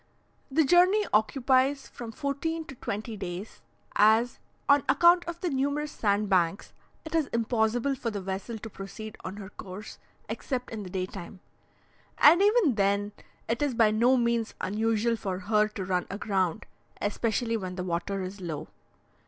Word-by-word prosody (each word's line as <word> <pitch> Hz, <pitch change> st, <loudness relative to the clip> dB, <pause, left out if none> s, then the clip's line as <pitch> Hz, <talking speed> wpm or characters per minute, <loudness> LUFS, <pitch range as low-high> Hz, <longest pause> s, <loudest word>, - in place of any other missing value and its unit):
The 310 Hz, +4 st, +3 dB
journey 365 Hz, +7 st, +5 dB
occupies 260 Hz, +5 st, +2 dB
from 235 Hz, -2 st, -8 dB
fourteen 305 Hz, +6 st, -3 dB
to 275 Hz, -, -9 dB
twenty 220 Hz, -2 st, -5 dB
days, 190 Hz, +1 st, -6 dB, 0.3 s
as, 220 Hz, +4 st, +4 dB, 0.3 s
on 285 Hz, 0 st, +6 dB
account 345 Hz, +5 st, +6 dB
of 340 Hz, 0 st, -6 dB
the 360 Hz, -, 0 dB
numerous 285 Hz, +2 st, -1 dB
sand 205 Hz, -3 st, +1 dB
banks, 185 Hz, -1 st, +1 dB, 0.3 s
it 315 Hz, -, -8 dB
is 320 Hz, -4 st, +2 dB
impossible 230 Hz, +3 st, +1 dB
for 255 Hz, -3 st, -3 dB
the 210 Hz, -2 st, -4 dB
vessel 195 Hz, +4 st, -4 dB
to 220 Hz, -, -8 dB
proceed 200 Hz, +3 st, -8 dB
on 185 Hz, -, -5 dB
her 195 Hz, -2 st, -8 dB
course 195 Hz, +1 st, -9 dB, 0.3 s
except 250 Hz, -3 st, -4 dB
in 220 Hz, -2 st, -5 dB
the 190 Hz, -, -7 dB
day 185 Hz, 0 st, -2 dB
time, 190 Hz, 0 st, -9 dB, 0.8 s
and 335 Hz, +5 st, +7 dB
even 410 Hz, -, +4 dB
then 200 Hz, 0 st, +1 dB, 0.4 s
it 230 Hz, +3 st, -1 dB
is 285 Hz, -4 st, 0 dB
by 225 Hz, -2 st, +5 dB
no 240 Hz, +4 st, +4 dB
means 235 Hz, -2 st, 0 dB
unusual 225 Hz, +3 st, +1 dB
for 195 Hz, -4 st, -3 dB
her 210 Hz, +3 st, +2 dB
to 205 Hz, -3 st, -6 dB
run 180 Hz, -1 st, -1 dB
aground, 195 Hz, -1 st, -1 dB, 0.3 s
especially 225 Hz, +2 st, 0 dB
when 185 Hz, -4 st, -4 dB
the 180 Hz, -, -3 dB
water 185 Hz, +2 st, -2 dB
is 190 Hz, +2 st, -7 dB
low. 160 Hz, -5 st, -5 dB
220 Hz, 160 wpm, -28 LUFS, 195-270 Hz, 0.8 s, and